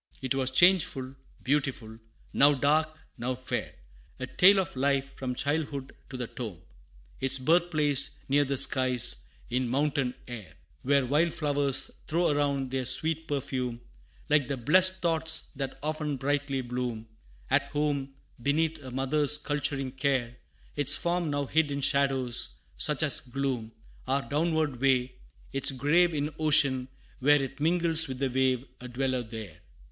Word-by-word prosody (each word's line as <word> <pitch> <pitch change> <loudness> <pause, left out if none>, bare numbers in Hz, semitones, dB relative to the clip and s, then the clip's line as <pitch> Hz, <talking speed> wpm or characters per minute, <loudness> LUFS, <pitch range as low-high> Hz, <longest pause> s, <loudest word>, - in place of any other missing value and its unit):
'Twas 130 0 0
changeful 135 -4 +3 0.3
beautiful; 130 -5 -1 0.3
now 145 +1 +5
dark, 155 +3 +1 0.2
now 125 +2 -2
fair 130 0 -4 0.4
A 130 - -3
tale 195 +8 +5
of 185 -7 -3
life, 140 +1 0
from 125 -1 -4
childhood 140 -1 -2 0.2
to 130 - -6
the 125 - -3
tomb 110 -7 -7 0.6
Its 135 +1 +2
birth 170 +7 +2
place 150 -4 +1 0.2
near 145 +2 +3
the 140 -1 -2
skies, 130 -2 +1 0.3
in 125 0 0
mountain 135 -1 0
air, 115 -6 -9 0.3
Where 140 0 +2
wild 155 +6 +1
flowers 145 -3 -1 0.2
throw 170 +1 +1
around 140 -2 0
their 130 -1 -2
sweet 160 +4 +1
perfume, 130 -4 -3 0.5
Like 150 -3 +2
the 140 - -3
blest 185 +9 +4
thoughts 160 -1 -1
that 135 -1 -5
often 150 -2 -2
brightly 140 0 -1
bloom, 120 -2 -4 0.4
At - - +3
home, 145 -2 -2 0.3
beneath 155 +4 0
a 130 -3 -9
mother's 140 +3 +2
culturing 145 -3 -2
care 130 -3 -1 0.4
Its 145 -2 +5
form 175 -2 -1
now 145 -1 -1
hid 155 +2 +1
in 140 0 -3
shadows, 135 - +1 0.2
such 150 0 0
as 150 - +5
gloom 125 -3 -3 0.4
Our 135 +1 +1
downward 155 -3 -1
way 130 -2 +2 0.4
its 135 - +1
grave 155 +6 +2
in 150 +1 -2
ocean, 140 -4 +4 0.3
where 145 +3 +5
It 135 0 -5
mingles 165 0 +1
with 130 -1 -5
the 135 0 -1
wave 130 0 +1
a 125 - -8
dweller 130 +1 -1
there! 110 -7 -9
140 Hz, 145 wpm, -28 LUFS, 130-150 Hz, 0.6 s, now